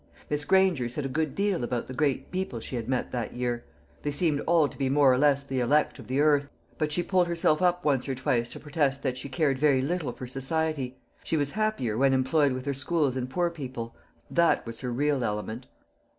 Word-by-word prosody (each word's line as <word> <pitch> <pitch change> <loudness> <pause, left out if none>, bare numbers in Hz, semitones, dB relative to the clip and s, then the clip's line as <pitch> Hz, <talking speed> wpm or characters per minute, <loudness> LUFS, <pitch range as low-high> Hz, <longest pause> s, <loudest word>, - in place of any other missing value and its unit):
Miss 150 0 0
Granger 185 -10 +3
said 135 +4 -3
a - - 0
good 155 +2 -2
deal 200 -7 0
about 120 0 -2
the 130 - -8
great 140 0 0
people 185 -10 -3
she 120 - -6
had 115 0 -4
met 130 -1 -1
that 120 -1 -3
year. 120 -1 -2 0.4
They 145 - -2
seemed 145 0 +1
all 165 -3 +4
to - - -12
be 135 -2 -1
more 140 -1 +5
or - - +2
less 140 -1 +4
the 135 -2 -3
elect 145 +4 +2
of 120 - -11
the 130 +3 0
earth: 145 -1 +3 0.3
but 155 -1 0
she 175 +4 0
pulled 180 -2 +2
herself 165 -1 +2
up 180 -1 +2
once 140 -2 +1
or 135 - -1
twice 120 -2 0
to - - -9
protest 145 -2 -1
that 130 -2 0
she 140 - -7
cared 135 -1 +1
very 140 -3 +3
little 160 -3 -1
for 125 - -8
society; 135 0 -2 0.3
she 160 - -1
was 145 -1 +1
happier 205 - -1
when 135 0 +4
employed 135 +2 +2
with 130 +1 -5
her 140 - 0
schools 145 -1 0
and 130 -1 -3
poor 175 +4 0
people 130 -7 -6 0.4
that 170 0 +3
was 115 -1 -7
her 125 -2 -4
real 140 +1 +1
element. 110 +3 -3
140 Hz, 225 wpm, -27 LUFS, 125-155 Hz, 0.4 s, more